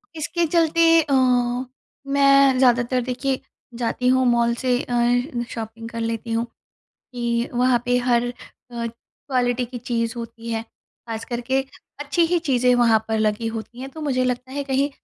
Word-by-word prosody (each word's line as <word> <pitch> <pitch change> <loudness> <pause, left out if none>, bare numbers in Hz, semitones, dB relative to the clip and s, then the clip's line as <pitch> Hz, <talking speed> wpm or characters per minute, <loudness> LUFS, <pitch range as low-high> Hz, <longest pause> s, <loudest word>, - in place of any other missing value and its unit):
इसके 335 +2 -1
चलते 335 0 +3 0.2
अ, 290 -2 -2 0.9
मैं 275 -1 +5
ज़्यादातर 250 0 +3
देखिए 255 +2 -2 0.4
जाती 250 +1 -1
हूँ 260 0 +4
मॉल 235 -1 +3
से 250 -1 +2
अ, 245 +1 0
शॉपिंग 225 0 -7
कर 230 - -6
लेती 230 0 -3
हूँ 230 +1 0 0.7
कि 235 -1 -1
वहाँ 245 -1 +2
पे 245 0 +2
हर 240 0 +3
अ, - - -4 0.5
क़्वालिटी 245 +1 -3
की 245 +1 -7
चीज़ 230 -1 -2
होती 230 0 -7
है। 225 0 -2
ख़ास 225 0 -10
करके 245 +2 -1 0.4
अच्छी 290 +4 +1
ही 350 +1 +2
चीज़ें 250 -2 +3
वहाँ 230 -2 +4
पर 220 0 0
लगी 215 +1 0
होती 235 +3 -8
हैं। 265 - -6
तो 315 - -10
मुझे 260 -4 0
लगता 250 +1 -2
है 285 0 -2
कहीं 275 +1 0
245 Hz, 160 wpm, -22 LUFS, 235-265 Hz, 0.9 s, मैं